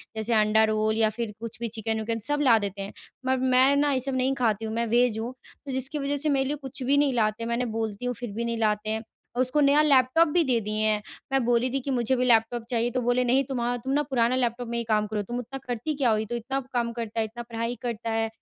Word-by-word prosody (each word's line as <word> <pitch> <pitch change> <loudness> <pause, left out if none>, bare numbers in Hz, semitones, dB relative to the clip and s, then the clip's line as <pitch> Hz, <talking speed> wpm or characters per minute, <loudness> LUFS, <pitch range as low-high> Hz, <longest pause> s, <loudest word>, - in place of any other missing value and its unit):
जैसे 220 +2 -1
अंडा 215 0 +4
रोल 215 0 0
या 220 -1 +3
फिर 225 -3 -2
कुछ 230 0 -7
भी 235 - -2
चिकन-विकन 220 0 -3
सब 290 0 +1
ला 245 -6 +6
देते 200 -1 -4
हैं। 195 - -6 0.3
पर 260 0 +2
मैं 260 +2 +4
ना 290 0 +2
ये 265 - +1
सब 265 +1 -2
नहीं 260 +1 +1
खाती 225 -4 0
हूँ, 220 - -4
मैं 235 0 0
वेज़ 235 -1 +2
हूँ, 235 +3 -4 0.3
तो 275 - -5
जिसकी 270 +3 -1
वज़ह 285 +1 -1
से 305 +2 0
मेरे 270 -2 +2
लिए 290 - -1
कुछ 270 +1 -8
भी 275 +3 +3
नहीं 285 -2 +3
लाते, 220 -1 0
मैंने 235 +2 -1
बोलती 225 0 -3
हूँ, 245 - 0
फिर 240 0 -6
भी 230 +3 -3
नहीं 235 0 -2
लाते 215 -1 0
हैं। 220 +1 -2 0.4
उसको 255 +3 +2
नया 285 +1 +5
लैपटॉप 285 +2 +4
भी 335 +3 +2
दे 255 -5 +1
दिए 215 +1 -3
हैं, 215 -1 +2 0.3
मैं 270 -1 +2
बोली 240 +1 +2
थी 275 - +1
कि 275 - -3
मुझे 245 0 +1
भी 250 0 +1
लैपटॉप 235 0 +3
चाहिए, 240 -1 +1
तो 255 - -1
बोले 245 +1 +2
नहीं 260 +3 +3
तुमहा 245 -2 -1
तुम 260 +3 -5
ना 290 - +3
पुराना 255 -3 +1
लैपटॉप 245 -1 -1
में 235 - -3
ही 235 - -1
काम 215 -2 +1
करो। 210 0 -2
तुम 240 +5 -4
इतना 245 +3 -6
करती 245 +6 -2
क्या 265 -4 +2
हो, 220 - +3
ये 215 - -2
तो 240 +3 -4
इतना 245 +4 -2
काम 235 -1 0
करता 230 -1 -4
है, 220 - +1
इतना 235 +2 -8
पढ़ाई 230 0 -3
करता 235 -2 -3
है, 225 0 0
240 Hz, 270 wpm, -26 LUFS, 220-260 Hz, 0.4 s, ला